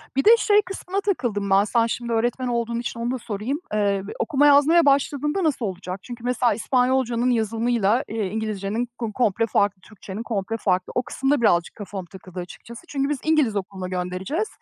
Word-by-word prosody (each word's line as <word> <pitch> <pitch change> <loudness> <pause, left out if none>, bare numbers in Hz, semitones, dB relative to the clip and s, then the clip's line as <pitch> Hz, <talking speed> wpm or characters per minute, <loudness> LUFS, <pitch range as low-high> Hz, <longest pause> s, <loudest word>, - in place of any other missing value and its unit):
Bir 270 - +2
de 460 +2 +8
şey 415 -2 +4
kısmına 390 0 -4
takıldım 230 - -1
ben. 195 +1 +5
Sen 230 +2 +2
şimdi 235 0 -3
öğretmen 240 +3 0
olduğun 235 -1 -1
için 235 -1 -5
onu 235 +1 -1
da 260 - -1
sorayım. 235 +5 -3
Eee, 200 -2 +1 0.2
okuma 285 +5 +3
yazmaya 295 +4 +6
başladığında 290 +5 +2
nasıl 275 -7 0
olacak? 185 0 -5
Çünkü 240 -1 -9
mesela 245 -2 +2
İspanyolcanın 250 +1 +1
yazımıyla, 230 0 +1
eee, 215 -3 -2
İngilizcenin 215 +2 -3
ko 225 -3 -4
komple 230 -1 +1
farklı, 200 -3 +1
Türkçenin 210 +1 -8
komple 225 0 -2
farklı. 185 -3 0
O 250 - +1
kısım 270 +3 -1
da 290 -5 +2
birazcık 175 -6 +2
kafama 200 -3 -6
takıldı 185 -1 -9
açıkçası. 230 +6 -9
Çünkü 275 -2 -1
biz 295 - 0
İngiliz 305 -9 +2
okuluna 190 -1 -4
göndereceğiz. 185 - -2
230 Hz, 180 wpm, -23 LUFS, 200-265 Hz, 0.2 s, de